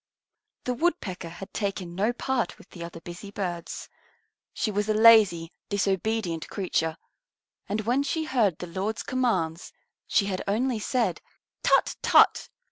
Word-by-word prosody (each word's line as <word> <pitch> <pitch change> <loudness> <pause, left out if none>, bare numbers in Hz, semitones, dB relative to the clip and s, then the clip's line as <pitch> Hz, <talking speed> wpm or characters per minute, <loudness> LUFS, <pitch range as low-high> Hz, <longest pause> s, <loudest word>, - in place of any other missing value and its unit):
The 250 - -1
Woodpecker 235 - -1
had 180 +3 -10
taken 195 -4 -3
no 205 +6 +1
part 245 0 -2
with - - -18
the 170 - -8
other 170 0 -8
busy 175 +4 -9
birds. 180 -4 -4 0.6
She 215 - -1
was 205 +1 -1
a 215 - +3
lazy, 210 -7 +6 0.2
disobedient 195 -3 -1
creature, 165 -5 -1 0.7
and 210 +2 0
when 245 +5 +1
she 305 +3 -1
heard 230 - +1
the - - -6
Lord's 190 +5 -3
commands 185 -11 -1 0.4
she 200 - +3
had 190 -2 -2
only 230 +3 +1
said, 245 +3 0 0.4
"Tut - - +3
tut!" - - +5
200 Hz, 140 wpm, -27 LUFS, 175-230 Hz, 0.7 s, lazy